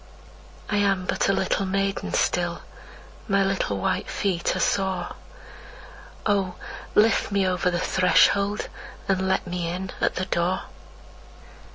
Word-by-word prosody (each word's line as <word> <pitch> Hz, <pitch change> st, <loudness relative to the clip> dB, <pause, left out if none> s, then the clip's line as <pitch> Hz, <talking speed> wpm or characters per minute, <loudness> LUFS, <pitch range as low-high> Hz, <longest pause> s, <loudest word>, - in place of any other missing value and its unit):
I 210 Hz, -, 0 dB
am 195 Hz, -2 st, +2 dB
but -, -, 0 dB
a -, -, +6 dB
little 195 Hz, 0 st, 0 dB
maiden 195 Hz, +1 st, -1 dB
still, -, -, 0 dB, 0.7 s
My 195 Hz, -2 st, +3 dB
little 195 Hz, -, 0 dB
white 95 Hz, -, -1 dB
feet 185 Hz, -4 st, 0 dB
are -, -, -2 dB
sore. 185 Hz, 0 st, 0 dB, 1.1 s
Oh, 195 Hz, -4 st, +1 dB, 0.4 s
lift 220 Hz, 0 st, +4 dB
me 200 Hz, -1 st, +2 dB
over 180 Hz, 0 st, +1 dB
the 175 Hz, -, -1 dB
threshold, 200 Hz, +3 st, +3 dB, 0.4 s
and 190 Hz, -1 st, +1 dB
let 190 Hz, -, +1 dB
me 175 Hz, -1 st, -3 dB
in 185 Hz, +2 st, -4 dB
at -, -, +1 dB
the 185 Hz, -, -1 dB
door! 180 Hz, +1 st, 0 dB
190 Hz, 135 wpm, -25 LUFS, 180-195 Hz, 1.1 s, a